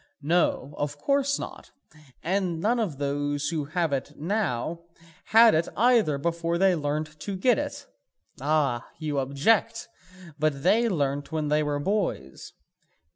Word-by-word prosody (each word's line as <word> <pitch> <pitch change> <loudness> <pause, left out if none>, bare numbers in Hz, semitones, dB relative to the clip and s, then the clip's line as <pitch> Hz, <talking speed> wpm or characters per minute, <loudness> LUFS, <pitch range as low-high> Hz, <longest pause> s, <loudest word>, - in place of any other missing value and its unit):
No, 150 -3 +1
of 145 0 -2
course 280 - +1
not, - - -8 0.5
and 180 -1 -1
none 230 +7 +1
of 185 -11 -2
those 145 +1 -1
who 160 -3 -2
have 160 0 -1
it 140 +2 -4
now 165 - -2 0.5
had 225 +1 +6
it 160 +2 +1
either 230 - +3
before 170 +3 -1
they 190 +1 +4
learnt 150 0 -3
to 190 +5 -4
get 230 +5 +2
it. - - -5 0.6
Ah, 140 -4 0
you 150 -3 -2
object, 140 +11 +1 0.5
but 145 -2 0
they 230 +6 +3
learnt 145 -5 -1
when 155 -2 -2
they 150 +1 +2
were 145 -1 -1
boys. 170 - -3
155 Hz, 140 wpm, -26 LUFS, 145-195 Hz, 0.6 s, had